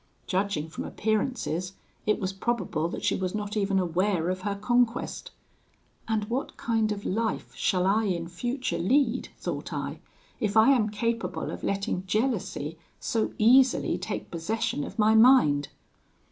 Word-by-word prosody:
Judging 185 -5 -1
from 160 - -6
appearances, 210 - -1 0.3
it 215 - +2
was 190 -1 -2
probable 195 -6 -1
that - - -6
she 210 - +2
was 185 +1 -2
not 210 0 -3
even 200 -2 +1
aware 180 0 +1
of 185 0 -4
her 200 +1 -2
conquest. 240 +3 0 0.8
'And 220 -2 0
what 245 +5 -3
kind 225 -2 0
of 205 -1 -4
life 220 +2 -2
shall 185 -3 +1
I 215 +3 +3
in 170 -4 -1
future 240 +1 -3
lead,' 255 +6 +2
thought - - -4
I, - - -4 0.4
'if 210 0 0
I 220 +5 +7
am 230 -6 +3
capable 215 -3 -2
of - - -7
letting 195 -1 -2
jealousy 200 - -1 0.2
so 225 -2 -1
easily 255 +4 +4
take - - -5
possession 220 - -2
of - - -8
my 215 0 +4
mind?' 220 - +6
210 Hz, 150 wpm, -27 LUFS, 185-230 Hz, 0.8 s, I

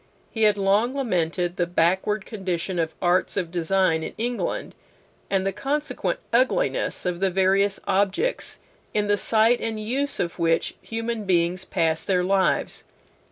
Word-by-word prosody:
He 220 -1 +2
had 210 -1 +4
long 205 +6 +2
lamented 180 -8 -1
the 175 - +1
backward 190 +4 +1
condition 185 -4 -3
of 160 -1 -1
arts 180 +3 +2
of 175 -4 -1
design 175 -1 +1
in - - -6
England, 240 +2 -2 0.6
and 195 -1 +1
the 195 - +1
consequent 290 +8 -2 0.2
ugliness - - +1
of 180 -1 -1
the 195 0 +2
various 195 +2 +2
objects 205 - 0 0.4
in 210 -1 +2
the 205 0 +3
sight 225 +3 +3
and 225 -1 -3
use 265 +7 -1
of 170 0 -2
which 165 -1 +1
human 225 -1 -4
beings 180 0 +1
pass 160 -1 0
their 180 -2 +1
lives. 190 0 +1
195 Hz, 150 wpm, -24 LUFS, 175-220 Hz, 0.6 s, had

